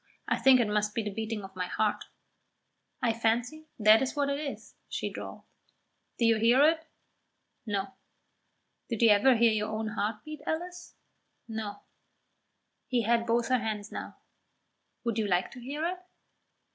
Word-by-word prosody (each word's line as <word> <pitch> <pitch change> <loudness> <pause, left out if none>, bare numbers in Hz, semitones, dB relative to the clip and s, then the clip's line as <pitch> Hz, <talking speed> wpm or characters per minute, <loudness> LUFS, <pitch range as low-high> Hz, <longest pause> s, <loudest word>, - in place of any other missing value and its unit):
I - - +1
think 265 -1 +6
it 235 - +2
must 210 0 0
be 230 - 0
the 210 - -3
beating 220 0 -4
of 190 0 -10
my 180 -1 -2
heart." 210 +3 -1 1.0
"I 235 -2 +3
fancy 240 +7 -1
that 215 0 +6
is 265 +2 -2
what 285 -1 +1
it 280 0 -1
is," 290 -2 -6 0.2
she - - -3
drawled. - - -8 0.7
"Do 235 - +2
you 230 -1 +4
hear 235 +4 +5
it?" 320 0 0 0.8
"No." 195 -2 -2 1.0
"Did 230 -1 -1
you 230 - +7
ever 225 +6 +5
hear 230 0 +5
your 215 0 -1
own 220 0 -2
heart 210 +1 -3
beat, 305 -1 -8
Alice?" 355 +2 -4 0.5
"No." 220 -2 -5 1.1
He 245 -2 +1
had 230 +1 +2
both 235 +1 +1
her 255 -1 +3
hands 215 -2 -4
now. - - -7 0.9
"Would 230 -2 -1
you 215 - 0
like 180 -1 +1
to 255 - -10
hear 290 +6 -3
it?" 360 +1 -2
230 Hz, 165 wpm, -29 LUFS, 210-260 Hz, 1.1 s, you